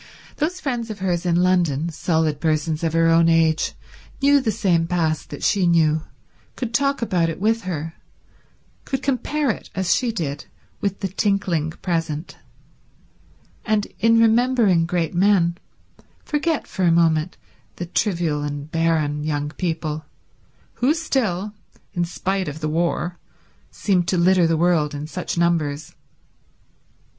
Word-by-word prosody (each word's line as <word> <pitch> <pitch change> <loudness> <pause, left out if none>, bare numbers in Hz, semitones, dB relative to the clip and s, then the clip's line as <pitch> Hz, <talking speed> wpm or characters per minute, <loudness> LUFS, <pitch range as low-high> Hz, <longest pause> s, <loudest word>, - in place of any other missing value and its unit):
Those 340 +5 -1
friends 240 -7 -3
of 215 - -5
hers 180 -2 -1
in 170 - +2
London, 170 -4 +2
solid 160 -2 0
persons 155 0 0
of 165 -1 0
her 165 0 +3
own 165 0 +5
age, 160 -1 +2 0.5
knew 285 0 +4
the 230 -4 0
same 175 -5 +1
past 160 -3 -1
that 145 - -8
she 195 -4 +2
knew, 160 -2 +3 0.5
could 240 -3 -4
talk 275 0 +1
about 180 -7 +1
it 165 - -5
with 220 +1 +1
her, 165 -3 -4 0.9
could 270 -1 -3
compare 280 +1 0
it - - -8
as 190 -2 +2
she 245 -3 0
did 145 -9 -4 0.3
with 200 -2 -2
the 195 - 0
tinkling 190 -5 0
present, 165 -2 -2 1.3
and 215 -2 +1
in 230 +1 +4
remembering 225 -6 +3
great 170 -2 -1
men 175 -2 +3 0.7
forget 300 +1 -1
for - - -6
a 170 - +4
moment 165 0 +2 0.4
the 175 - -5
trivial 170 -5 0
and 145 +1 -5
barren 155 -3 0
young 145 -1 -2
people 155 -3 -3 0.8
who 275 +6 +3
still, 215 - -1 0.4
in 175 -1 0
spite 190 +2 -2
of 145 +1 -5
the 155 -1 -2
war, 170 +2 -1 0.5
seemed 180 -4 0
to 185 - +1
litter 180 0 +4
the 165 0 +1
world 160 -3 +2
in 145 +1 -5
such 175 +2 -5
numbers. 160 -4 0
175 Hz, 145 wpm, -22 LUFS, 160-205 Hz, 1.3 s, own